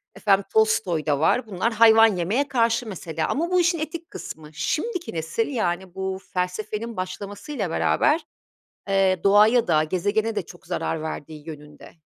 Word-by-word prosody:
efendim 200 -2 +2
Tolstoy 215 -7 +2
da 145 -3 +1
var. 225 - +2
Bunlar 215 +3 -1
hayvan 225 0 +7
yemeye 215 +12 0
karşı 235 -2 +1
mesela 165 -5 -4
ama 335 +5 -1
bu 365 - +4
işin 345 -1 +1
etik 325 +2 -5
kısmı. 155 -1 -9
Şimdiki 360 - -2
nesil, 165 +7 -2
yani 185 -8 -2
bu 190 0 -3
felsefenin 210 +5 -3
başlamasıyla 200 - -5
beraber, 300 - +2 0.7
eee, 190 -2 +2
doğaya 210 +4 +5
da 155 -2 +3
gezegene 205 +7 -1
de 205 - 0
çok 175 +1 -15
zarar 160 -1 -2
verdiği 155 -1 -7
yönünde, 150 -1 -11
200 Hz, 150 wpm, -24 LUFS, 175-230 Hz, 0.7 s, hayvan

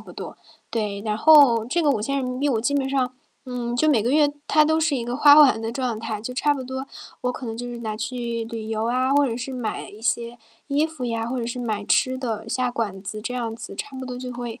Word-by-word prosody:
不 - - -12
多。 - - -8 0.3
对， 210 -3 -2
然 210 -1 -1
后 280 -7 +7
这 315 +9 0
个 295 - +3
¥5000 260 +3 -1
我 235 -5 +1
基 245 +5 0
本 270 -1 +1
上， 260 -2 0 0.3
嗯， 240 -1 -3
就 310 +5 +3
每 240 - +4
个 240 - 0
月 295 -1 +4
它 305 0 +5
都 315 +1 +2
是 310 -2 +2
一 235 - -3
个 240 +1 -3
花 290 0 +8
完 285 -7 +7
的 225 0 -3
状 245 -3 -2
态， 220 -2 -4
就 235 +4 -5
差 290 +2 +2
不 270 - -5
多， 260 +1 -5 0.4
我 250 0 0
可 255 - -8
能 225 0 -4
就 245 - -5
是 240 -1 -6
拿 215 -2 -4
去 230 +1 -3
旅 225 -1 -6
游 220 0 -1
啊， 255 +2 +1
或 285 0 +4
者 230 -2 -2
是 255 +2 -5
买 235 -4 -4
一 210 - -13
些 235 +1 -1 0.3
衣 290 +3 +2
服 315 -6 -7
呀， 230 -1 -2
或 255 +2 -3
者 235 - -2
是 240 +1 -4
买 215 -4 -2
吃 260 +4 +2
的 225 -3 -4
下 255 +1 0
馆 205 -5 -3
子， 215 +2 -6
这 250 +3 -4
样 230 -2 -3
子， - - -8
差 275 -2 -6
不 260 - -5
多 250 - -5
就 250 -1 -6
会， 240 -2 -6
245 Hz, 270 characters per minute, -23 LUFS, 225-270 Hz, 0.4 s, 花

